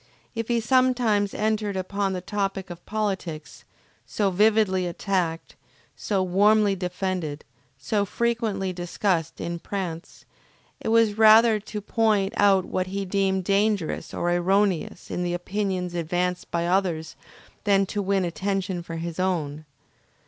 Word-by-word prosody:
If 230 -2 -3
he 235 -1 +1
sometimes 235 -4 +2
entered 210 -2 -1
upon 195 +1 -1
the 180 - -3
topic 195 -1 -3
of 175 0 -10
politics, 165 - -4 0.4
so 195 - -1
vividly 205 -2 +3
attacked, 175 -2 -2 0.4
so 195 -3 -1
warmly 205 +2 +3
defended, 180 -4 -3 0.3
so 200 +10 0
frequently 215 -3 -1
discussed 175 -1 -1
in 170 0 -4
Prance, 175 -3 -6 0.5
it - - -6
was 220 -1 +3
rather 220 0 +7
to 210 0 -7
point 210 -2 +1
out 195 -2 +4
what 185 0 -2
he 195 +1 -3
deemed 190 0 0
dangerous 200 -2 0
or 175 - -1
erroneous 185 0 0
in - - -2
the 175 0 -1
opinions 185 -1 -2
advanced 175 +2 -2
by 170 0 -1
others 175 -3 0 0.5
than 195 -1 +4
to 205 +2 -3
win 195 -1 +1
attention 190 0 -2
for 165 -1 -7
his 165 +1 -5
own. 155 -5 -1
195 Hz, 135 wpm, -25 LUFS, 175-210 Hz, 0.5 s, rather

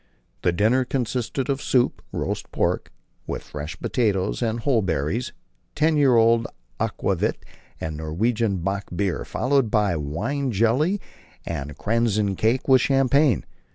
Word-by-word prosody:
The 90 - +2
dinner 110 +9 +3
consisted 125 +1 -2
of 140 -1 -1
soup, 125 -2 +1
roast - - -3
pork, - - -1 0.4
with - - -4
fresh 75 +1 -7
potatoes 95 - 0
and 115 0 0
whortleberries, 105 - 0 0.4
ten 155 +1 +3
years 135 -5 +5
old 115 0 +4 0.3
aquavit - - -1 0.4
and 80 -1 -4
Norwegian 100 +7 0
bock 100 +1 -2
beer, 95 -2 -1
followed 135 -2 +1
by 105 -4 +2
wine 105 - -2
jelly 125 - +2 0.5
and 75 -3 -5
"kransekake," 110 +1 +1
with 130 -2 +6
champagne. 135 0 +3
115 Hz, 120 wpm, -24 LUFS, 95-130 Hz, 0.5 s, with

